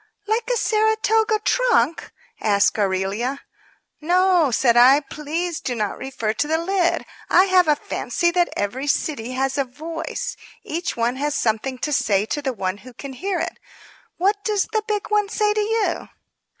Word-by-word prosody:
"Like 450 +3 -1
a - - +2
Saratoga 440 0 +2
trunk?" 470 - +2 0.3
asked 205 0 +2
Aurelia. 200 +7 -1 0.6
"No," 355 -1 +3
said 235 0 +3
I. 260 +4 +7
"Please 315 +4 -4
do 250 - -3
not 210 -3 -2
refer 230 -5 -3
to 295 - -1
the 320 +1 +1
lid. 350 +1 0 0.2
I 365 - +6
have 370 -3 +4
a 300 - +4
fancy 345 +3 -1
that 350 0 +2
every 250 +8 -2
city 255 -4 -1
has 270 +2 -1
a - - +3
voice. 325 - -5 0.3
Each 335 -2 -4
one 235 +2 0
has 290 +1 -1
something 235 +4 -1
to 300 +4 -2
say 205 -6 +2
to 295 - -3
the 270 -2 -1
one 190 -4 -3
who 255 +2 -13
can 275 +2 -8
hear 375 +8 -2
it. - - -4 0.6
What 405 +3 +1
does 420 -3 +1
the 435 - +2
big 420 -1 -2
one 415 -1 +2
say 420 -1 +1
to 425 - 0
you?" 420 -4 -1
305 Hz, 170 wpm, -22 LUFS, 250-395 Hz, 0.6 s, I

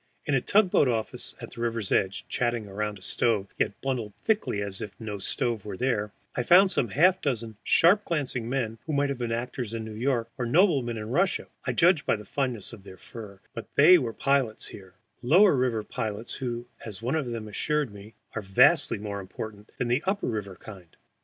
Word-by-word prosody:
In 145 - -1
a 135 - +3
tug 200 - +3
boat 140 - +4
office 115 -3 -3
at - - -9
the 120 - -8
river's 115 -4 -1
edge, 100 +2 +1
chatting 120 -3 -1
around 105 +1 -3
a 95 - -16
stove, 105 -4 0
yet - - 0
bundled 120 -6 -3
thickly 205 - 0
as 100 -1 -5
if 100 -2 -8
no 105 -3 -5
stove 115 +2 -1
were 100 -3 -6
there, 105 -4 0 0.2
I - - 0
found 185 +9 +6
some 135 - +1
half 180 - +3
dozen 115 -5 -2
sharp 195 +5 +5
glancing 130 -7 -2
men, 115 -4 -2
who 155 - -2
might 140 0 +1
have 140 -2 -3
been 120 -1 -2
actors 120 -1 -3
in 110 -1 -4
New 110 - -7
York 120 +1 0
or 120 - -1
noblemen 135 - +3
in 110 +1 -6
Russia 180 +7 +1 0.2
(I - - 0
judge 170 -2 +4
by - - +3
the 105 -1 -9
fineness 120 -3 -3
of 105 -4 -11
their 95 -2 -12
furs), 100 -4 -11
but 115 - -7
were 145 -5 +6
pilots 135 -5 0
here, 95 -1 -12 0.3
lower 175 +9 +5
river 125 -4 0
pilots 110 +1 -4
who, 120 -2 -4 0.2
as 110 -1 -8
one 125 - 0
of 155 -5 -1
them 115 -2 -5
assured 145 +4 -1
me, 100 +1 -12 0.2
are 110 - -3
vastly 95 -1 +4
more 100 -1 -5
important 105 +2 -8
than 125 - -1
the 120 +4 +1
upper 200 +1 0
river 105 -5 -3
kind. 95 -4 -13
115 Hz, 205 wpm, -27 LUFS, 105-135 Hz, 0.3 s, found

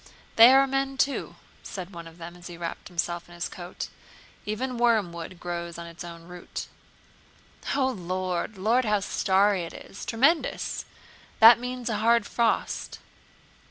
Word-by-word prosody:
"They 230 +3 +10
are 270 +1 +6
men 270 0 -1
too," 275 0 0 0.3
said 185 -1 -7
one 170 -1 -8
of 165 0 -14
them 170 0 -9
as 175 0 -11
he 175 -1 -9
wrapped 170 -1 -5
himself 175 -1 -3
up - - -22
in 175 - -12
his 175 - -3
coat. 175 0 -7 0.6
"Even 245 +4 -2
wormwood 185 -7 +1
grows 170 -1 -5
on 170 - -7
its 170 0 -9
own 170 -1 -9
root." 180 +1 -7 1.1
"O 275 -2 +2
Lord, 185 -3 -2
O - - -10
Lord! 235 +5 +3
How 210 -2 +2
starry 195 0 +2
it 165 - -7
is! 195 - -10
Tremendous! 265 +8 +1 0.5
That 230 +1 +9
means 250 0 -5
a 220 -3 0
hard 230 +1 +3
frost...." 235 -1 -1
195 Hz, 160 wpm, -27 LUFS, 175-240 Hz, 1.1 s, They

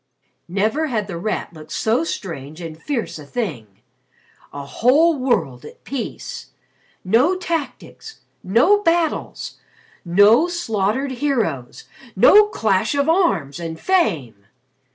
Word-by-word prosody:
Never 215 - 0
had 220 -7 -1
The 195 -4 -7
Rat 210 -2 -3
looked 155 -1 -13
so 225 +7 +1
strange 155 - -6
and 165 -2 -8
fierce 225 - -3
a - - -9
thing. 155 - -4 0.8
A 140 0 -7
whole 290 - +3
world 190 - -1
at - - -13
peace! 270 -4 -6 0.6
No 245 - +3
tactics 350 +5 -5 0.2
no 250 - +3
battles 335 -4 -1 0.4
no 205 - +5
slaughtered 260 - -1
heroes 230 - -2 0.3
no 415 - +7
clash 220 - 0
of 280 +1 +1
arms, 195 - +1
and 165 -1 -6
fame! 145 - 0
220 Hz, 115 wpm, -20 LUFS, -, 0.8 s, no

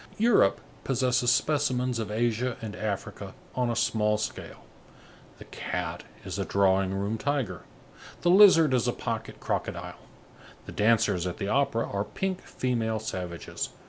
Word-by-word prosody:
Europe 215 - +4 0.2
possesses 125 -1 +2
specimens 130 -4 +1
of 110 -3 -3
Asia 120 +3 0
and 110 -2 -6
Africa 105 -3 -5 0.2
on 125 -1 0
a 115 - -1
small 105 -2 +1
scale. 110 - -6 0.7
The - - -12
cat - - -4 0.2
is - - -4
a - - +1
drawing 95 -1 +2
room 100 +3 -2
tiger, 130 - -1 0.6
the 175 - +4
lizard 180 -7 +7
is 125 -1 +2
a 120 - +1
pocket 115 -1 -5
crocodile. - - -4 0.7
The - - -8
dancers 105 -5 +2
at 90 - -4
the 100 - -3
opera 125 -3 +1
are 100 0 -2
pink 190 - -3
female 115 -3 -1
savages. 90 -6 -5
115 Hz, 145 wpm, -27 LUFS, 105-130 Hz, 0.7 s, lizard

